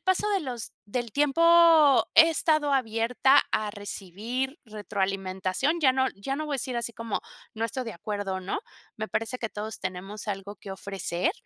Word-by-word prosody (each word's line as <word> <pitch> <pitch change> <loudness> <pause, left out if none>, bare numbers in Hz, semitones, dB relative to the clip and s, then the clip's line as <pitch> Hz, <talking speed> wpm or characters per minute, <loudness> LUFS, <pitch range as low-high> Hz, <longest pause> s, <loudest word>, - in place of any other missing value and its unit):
paso 375 +2 +1
de 395 -2 +2
los 250 -7 -6
del 235 +2 -3
tiempo, 320 0 +5
he 325 0 +9
estado 310 -2 +2
abierta 250 +3 +3
a 215 -1 0
recibir 220 - -4
retroalimentación, 195 - -2
ya 265 -4 +5
no 260 0 +2
ya 270 +8 -4
no 310 - -3
voy 295 - -2
a - - 0
decir 255 -1 -3
así 235 0 -2
como: 230 -2 -3 0.3
"No 225 +1 -2
estoy 250 +3 -3
de 225 - -6
acuerdo", 200 +1 -3
¿no? 185 - -3 0.4
Me 215 0 -4
parece 225 +3 -2
que 225 - -3
todos 215 +1 -6
tenemos 195 +4 -6
algo 200 0 -4
que 195 - -10
ofrecer, 190 -2 -2
230 Hz, 175 wpm, -27 LUFS, 200-275 Hz, 0.4 s, he